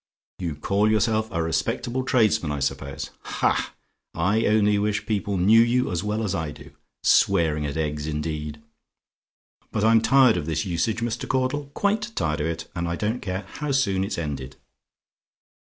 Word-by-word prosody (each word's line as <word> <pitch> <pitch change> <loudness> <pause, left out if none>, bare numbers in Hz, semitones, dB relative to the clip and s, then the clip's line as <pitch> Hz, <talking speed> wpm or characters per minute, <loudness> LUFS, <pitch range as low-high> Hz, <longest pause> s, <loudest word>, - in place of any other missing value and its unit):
You 85 -5 -3
call 100 +8 +1
yourself 110 0 +1
a 85 -5 -1
respectable 120 +9 -1
tradesman, 110 - +2
I 75 - -2
suppose? 70 0 -3
Ha! - - 0 0.4
I 95 +7 +2
only 105 -1 +3
wish 105 0 -1
people 100 -2 -1
knew 105 +6 +6
you 120 +2 +2
as 90 +1 -2
well 105 +2 -1
as 100 - -1
I 80 -2 -2
do! 75 - -12 0.3
Swearing 75 -3 +3
at 70 - -4
eggs, 75 -1 -2
indeed! 75 -1 -4 1.1
But 110 - -1
I'm 115 0 +5
tired 130 -4 +5
of 80 -3 -3
this 80 -1 -1
usage, 100 +6 -1
Mr. 120 0 -3
Caudle; 130 +2 0
quite 210 +3 0
tired 75 0 -1
of 75 - 0
it; 85 0 -4
and 85 -1 -2
I 85 - -1
don't 110 +6 -2
care 95 0 -4
how 150 +7 -4
soon 100 -9 +1
it's 100 - -3
ended! 70 -5 -4
100 Hz, 170 wpm, -24 LUFS, 80-115 Hz, 1.1 s, knew